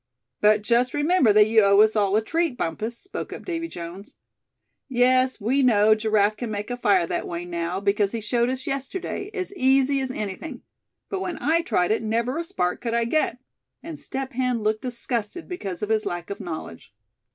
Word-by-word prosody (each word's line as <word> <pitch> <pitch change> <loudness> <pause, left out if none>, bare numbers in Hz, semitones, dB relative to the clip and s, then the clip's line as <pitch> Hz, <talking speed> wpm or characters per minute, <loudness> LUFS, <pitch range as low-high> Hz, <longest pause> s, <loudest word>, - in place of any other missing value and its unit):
"But 210 0 +4
just 240 +4 +2
remember 295 -5 +3
that 210 0 +6
you 220 +1 +4
owe 200 0 +5
us 220 0 +4
all 200 -2 +2
a 220 - +2
treat, 325 +1 -1
Bumpus," 220 +8 -3
spoke 380 - -7
up - - -8
Davy 330 -2 -3
Jones. 175 - -9 0.7
"Yes, 255 0 +3
we 250 +7 +1
know 215 -4 +5
Giraffe 215 -1 +2
can 240 0 -4
make 210 +2 -4
a - - -1
fire 200 -7 +3
that - - -3
way 170 0 -5
now, 170 +1 -3
because 200 0 +1
he 230 - -3
showed 235 +3 0
us 260 +2 -3
yesterday, 315 +8 -4
as 395 -2 -4
easy 270 -4 +3
as 260 - -3
anything; 245 - -5 0.4
but 390 - -3
when 360 -3 -4
I 325 +3 +2
tried 180 - +1
it, 220 - +1
never 235 +6 -1
a - - -1
spark 180 - -2
could 235 -1 -2
I 235 0 +2
get," 250 -1 0 0.5
and 325 -2 -7
Step 265 0 -5
Hen 250 -2 0
looked 215 0 0
disgusted 240 +3 -4
because 200 - -5
of 210 - -2
his 220 -1 +2
lack 175 +2 -4
of 200 - -5
knowledge. 105 - -7
230 Hz, 195 wpm, -24 LUFS, 205-270 Hz, 0.7 s, that